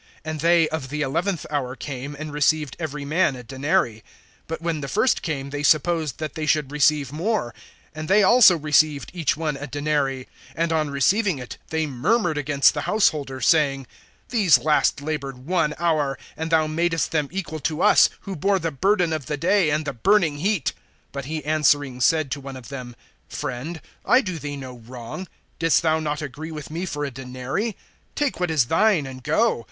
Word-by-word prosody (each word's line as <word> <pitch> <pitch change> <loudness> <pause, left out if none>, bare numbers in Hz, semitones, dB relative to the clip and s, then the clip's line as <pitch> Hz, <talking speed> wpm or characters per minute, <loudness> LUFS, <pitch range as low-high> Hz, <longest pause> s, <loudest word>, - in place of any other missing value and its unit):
(9)And 155 -1 -4
they 170 0 +4
of 155 -5 -4
the 150 +1 -2
eleventh 165 +6 -1
hour 130 -3 -2
came, 140 +1 -6
and 155 0 -6
received 150 -1 +1
every 150 -3 -4
man 155 -1 +2
a 125 - -9
denary. 130 -3 0 0.5
(10)But 165 - -3
when 165 -2 -2
the 140 - -4
first 255 - +1
came, 140 -4 -4
they 145 0 -3
supposed 155 -1 +2
that 155 -1 -5
they 155 -1 -4
should 150 -2 +1
receive 150 -2 +2
more; 165 - -1 0.4
and 155 0 -6
they 205 +3 +5
also 195 -3 +7
received 150 -1 +2
each 165 -5 0
one 155 -3 -2
a 145 +1 -6
denary. 145 -2 -1 0.3
(11)And 165 0 0
on 155 -2 +1
receiving 185 - +2
it, 125 -2 -8
they 160 0 0
murmured 155 - 0
against 145 -1 +3
the 145 - -3
householder, 150 -11 +1
(12)saying: 135 0 +2 0.4
These 205 -9 +5
last 150 -1 +2
labored 140 -4 -5
one 165 -3 +1
hour, 155 -5 0 0.2
and 160 +1 -4
thou 160 -1 +3
madest 165 +2 0
them 150 -3 0
equal 170 -4 -4
to 155 +3 -2
us, 210 - +6
who 195 - -6
bore 195 +5 +2
the 165 -3 -2
burden 180 +2 +1
of 150 -5 -4
the 150 - -2
day, 180 +2 +2
and 150 +1 0
the - - -3
burning 165 - +2
heat. 195 -2 0 0.4
(13)But 140 -1 -5
he 155 0 -5
answering 145 -4 +2
said 155 +1 +2
to 140 - -3
one 135 0 -8
of 130 - -11
them: 125 -3 -7 0.3
Friend, 145 +7 -5 0.2
I 255 - +5
do 185 -7 -5
thee 145 -1 -5
no 130 -2 -8
wrong. 120 +9 -8 0.3
Didst 165 -2 +3
thou 160 -1 +2
not 150 -1 -3
agree 150 +3 -7
with 150 -2 -8
me 175 +4 -3
for 145 -3 -3
a 140 - -5
denary? 130 - -4 0.4
(14)Take 290 - -1
what 180 -1 0
is 155 -6 +3
thine, 175 - +2
and 130 -1 -8
go. 160 - +2
150 Hz, 190 wpm, -23 LUFS, 140-165 Hz, 0.5 s, also